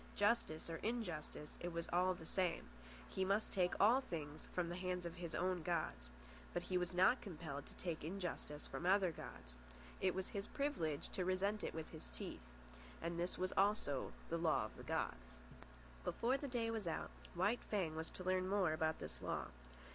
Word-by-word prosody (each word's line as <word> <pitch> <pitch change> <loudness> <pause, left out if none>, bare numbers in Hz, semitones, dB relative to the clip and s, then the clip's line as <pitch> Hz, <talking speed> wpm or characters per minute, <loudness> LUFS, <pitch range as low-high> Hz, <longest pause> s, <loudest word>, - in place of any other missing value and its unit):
Justice 205 -7 +2
or 165 -1 -2
injustice, 175 -10 -3
it 175 - -2
was 170 0 -2
all 180 +1 +4
the 160 - -9
same, 180 0 +1 0.4
he 190 - 0
must 200 +3 +2
take 180 -2 +3
all 235 +6 +7
things 155 - -5
from 180 -2 +1
the 175 - -3
hands 180 -1 -1
of 170 - -3
his 170 -2 -4
own 180 -1 +1
gods. 60 - -1 0.5
But - - +1
he 185 - -2
was 180 0 +2
not 185 +8 +5
compelled 155 -7 -5
to - - -10
take 170 -5 -3
injustice 170 -4 -3
from - - -4
the 175 - +3
other 190 -2 +5
gods. 60 - -9 0.5
It 185 -1 +3
was 190 0 -1
his 200 0 -3
privilege 170 - 0
to 185 - -1
resent 195 +3 +1
it - - -2
with 160 -1 -4
his 60 - -8
teeth. - - -5 0.6
And 170 +1 -2
this 175 +1 -1 0.2
also 195 -9 +3 0.2
was 170 - 0
a - - -4
law 160 -2 +4
of - - -9
the - - -9
gods. - - -2 0.7
Before 245 - +2
the 280 +1 -2
day 235 -3 0
was 220 -5 -2
out, 165 - -1 0.2
White 205 +7 +2
Fang 180 -7 +1
was 160 +1 -2
to 185 - -7
learn 185 0 +2
more 190 -5 +4
about 160 0 +2
this - - -6
law. - - -1
180 Hz, 195 wpm, -41 LUFS, 160-195 Hz, 0.7 s, all